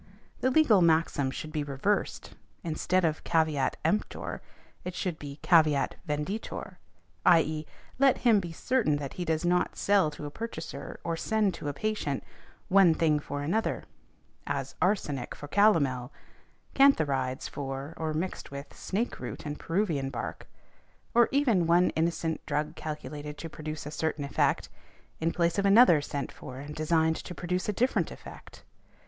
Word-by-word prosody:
The 260 - +2
legal 255 -9 +5
maxim 160 -4 +3
should 155 +3 -6
be 150 -1 -1
reversed, 145 +9 -1 0.3
instead 170 +2 +1
of 155 -1 -1
caveat 160 -5 +1
emptor 210 - -1 0.4
it 180 0 -5
should 175 -4 -3
be 140 -1 -8
caveat 155 -5 +4 0.2
venditor, 150 +9 -4 0.5
i.e., 155 -3 +3 0.3
let 270 -1 +5
him 230 -4 +4
be 175 -3 -5
certain 210 - +1
that 145 -2 -4
he 180 - -4
does 160 +1 0
not 180 0 +1
sell 200 -5 +3
|178| - - -11
to 150 - -7
a 145 - -5
purchaser 230 +8 -6
or 165 -1 -1
send 210 +2 +1
to - - -6
a - - -3
patient, 150 -5 -2 0.4
one 185 -4 +6
thing 155 -2 +2
for 145 -1 -5
another, 205 +10 0 0.6
as - - -2
arsenic 150 -10 0
for 145 - -9
calomel, 140 - +3 0.6
cantharides 145 - +3
for, 135 +2 -5
or 160 -1 -2
mixed 165 +4 -3
with 140 0 -8
snake 220 +6 -2
root - - -6
and 145 0 -5
Peruvian 165 -7 0
bark, 125 -3 -6 0.7
or 235 0 +5
even 235 - +3
one 175 +2 +4
innocent 165 0 -1
drug 150 0 -1
calculated 150 -1 -6
to 165 - -6
produce 155 -1 -6
a 150 - -5
certain 155 -1 -2
effect, 140 - +1 0.5
in 165 +1 +1
place 170 +2 +1
of 200 - +1
another 195 -7 +7
sent 145 -1 -4
for 130 - -10
and 145 +2 -7
designed 160 +1 +2
to 180 - -8
produce 180 +2 -2
a - - +1
different 250 +6 +1
effect. - - -12
160 Hz, 155 wpm, -29 LUFS, 145-190 Hz, 0.7 s, another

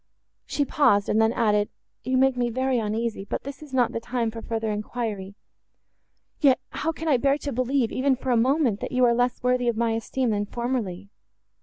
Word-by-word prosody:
She 290 - 0
paused, 205 -9 +3
and 220 - +3
then 220 0 +4
added, 210 -3 +2 0.3
"You 255 0 0
make 265 0 +4
me 245 -1 0
very 260 +1 0
uneasy; 220 -1 -2
but 200 - -4
this 280 +2 -8
is 300 -3 -11
not 250 -3 +2
the - - -3
time 230 -1 -2
for 225 0 -7
further 225 -1 -2
enquiry;—yet, 210 +5 -4
how 325 - -1
can 325 0 -6
I 285 -5 +4
bear 275 +3 +2
to 290 -1 -5
believe, 255 0 0
even 265 +1 +2
for 260 0 -3
a - - +4
moment, 250 -2 +2
that - - -5
you 255 0 +4
are 235 - +4
less 245 +1 0
worthy 250 -1 +2
of 235 -2 +1
my 230 0 +1
esteem 230 +2 -1
than 205 -1 -1
formerly? 215 -6 -3
240 Hz, 200 wpm, -25 LUFS, 220-260 Hz, 0.3 s, then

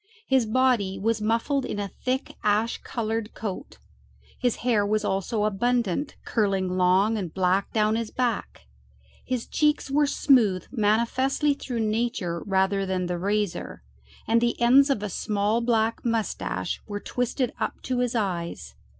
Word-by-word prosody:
His 260 - +2
body 225 -5 +2
was 220 +2 0
muffled 230 +6 +1
in 230 - -4
a 200 - -2 0.2
thick 260 +2 -1
ash 215 +2 +1
coloured 225 -1 -3
coat; 205 -4 -6 0.6
his 245 -3 +1
hair 225 -5 +3
was 210 +1 0
also 205 +3 -1
abundant, 235 - 0
curling 195 -4 0
long 190 +4 +3
and 180 -5 -4
black 190 +2 +1
down 215 0 +2
his 230 -1 -2
back; 245 -4 -2 0.6
his 250 -2 -2
cheeks 300 -2 +1
were 295 +1 +3
smooth 230 -11 +3
manifestly 255 +6 +1
through 250 -4 -4
nature 215 -6 -1
rather 195 0 +2
than 185 -1 -1
the 175 0 -3
razor, 205 - -2 0.4
and 230 +1 +3
the 235 0 0
ends 260 +4 +6
of 220 -7 0
a - - -1
small 210 +3 0
black 230 -1 +1
mustache 230 -2 -2
were 205 -1 -4
twisted 245 +2 -2
up - - -2
to 255 -1 -1
his 245 -1 0
eyes. 170 - -3
220 Hz, 150 wpm, -25 LUFS, 200-245 Hz, 0.6 s, ends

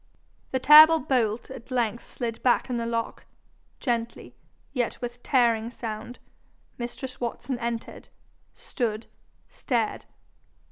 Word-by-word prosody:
The 260 - 0
terrible 310 +4 +9
bolt 240 -4 -1
at 260 -2 -10
length 235 -3 -1
slid 230 -2 -5
back 250 0 +2
in 245 - -1
the 230 0 -2
lock, 230 -1 -3 0.5
gently, 235 -2 -3 0.4
yet 245 -4 -2
with 245 0 -6
tearing 235 -4 +2
sound; 235 0 -7 0.6
mistress 250 +2 -6
Watson 240 +1 -3
entered, 235 -1 -5 0.5
stood, 225 -3 -3 0.4
stared. 230 -4 -2
240 Hz, 110 wpm, -26 LUFS, 230-255 Hz, 0.6 s, terrible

